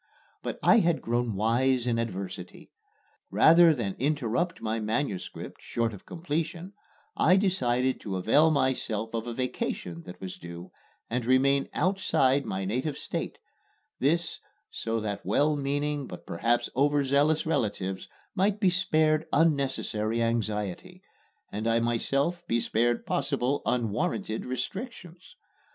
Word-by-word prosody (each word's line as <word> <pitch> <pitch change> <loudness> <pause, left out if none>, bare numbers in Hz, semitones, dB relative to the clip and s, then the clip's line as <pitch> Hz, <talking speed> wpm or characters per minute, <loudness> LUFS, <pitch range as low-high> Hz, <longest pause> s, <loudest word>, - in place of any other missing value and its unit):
But - - -4
I - - +7
had 170 -5 +2
grown 120 -2 0
wise 120 +4 +2
in 115 -2 +1
adversity. 95 -5 -6 0.6
Rather 165 +1 +7
than 115 -10 -1
interrupt 150 +5 0
my 110 +1 -2
manuscript 110 -2 -3
short 115 -1 -1
of 100 - -12
completion 170 +3 -3 0.4
I 185 - +5
decided 130 -10 +1
to 100 -3 -4
avail 130 - +4
myself 125 -6 0
of 115 +1 -3
a 120 - -3
vacation 90 -9 -3
that 90 - -9
was 95 -1 -7
due, 85 +1 -9 0.4
and 125 +1 -2
remain 135 +3 +3
outside 145 -8 +2
my 95 0 -2
native 130 +9 -2
State - - -4 0.6
this, 165 +5 +1 0.3
so 115 0 -2
that 105 -2 -4
well 150 +1 +2
meaning 145 0 -1
but 90 - -9
perhaps 115 +8 0
overzealous 145 +2 +2
relatives 105 - -1 0.3
might 200 +2 +1
be 190 -4 +4
spared 155 -4 +2
unnecessary 135 -8 +1
anxiety, 105 -4 -2 0.5
and 110 +2 -3
I 115 0 +3
myself 135 +9 0
be 120 - +2
spared 120 +1 +1
possible 140 -1 0
unwarranted 110 -1 -1
restrictions. 180 - -6
130 Hz, 125 wpm, -28 LUFS, 110-155 Hz, 0.6 s, I